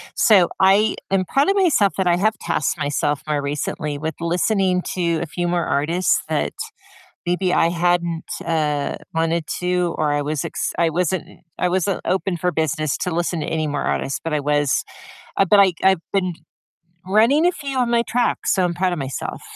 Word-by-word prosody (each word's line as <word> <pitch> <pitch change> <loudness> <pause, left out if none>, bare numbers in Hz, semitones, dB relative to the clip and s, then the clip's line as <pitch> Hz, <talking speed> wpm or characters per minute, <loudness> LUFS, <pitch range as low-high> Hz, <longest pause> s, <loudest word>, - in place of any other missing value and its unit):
So, 190 -6 +5
I 200 +3 +4 0.2
am 190 -1 +2
proud 280 - +2
of 400 - +2
myself 250 - +3
that 190 -2 +1
I 175 - +4
have 215 +3 +1
tasked 155 - -1
myself 145 0 -1
more 150 -1 0
recently 145 +1 -3
with 160 0 -4
listening 180 +2 +1
to 170 -3 0
a - - -2
few 175 +3 -4
more 175 -1 0
artists 165 +6 +1
that - - -1 0.7
maybe 180 +1 0
I 165 - +3
hadn't, 170 -1 0 0.2
uh, 150 -3 -1 0.2
wanted 165 0 0 0.2
to, 180 -1 0
or 150 -2 0
I 145 0 0
was 150 -1 -2
ex - - -3
I 165 -1 +2
wasn't 180 +2 -1 0.3
I 180 - 0
wasn't 185 +1 0
open 185 0 0
for 180 +1 0
business 155 -2 -1
to 180 -3 -2
listen 170 0 -1
to - - -3
any 155 -1 -1
more 145 - -2
artists, 135 - -1
but 160 -2 -2
I 150 - +1
was 145 -1 +1 0.5
uh, 195 - +3
but 205 +3 +5
I 195 -2 +6
I've 190 -3 +3
been 185 -3 0 0.7
running 230 - +4
a 360 - +3
few 275 -4 -6
on 245 -2 +1
my 235 0 +3
track, 240 +1 -1
so, 185 -2 +2
I'm 175 - 0
proud 180 +1 0
of - - -6
myself. 135 -1 -5
175 Hz, 195 wpm, -21 LUFS, 155-190 Hz, 0.7 s, I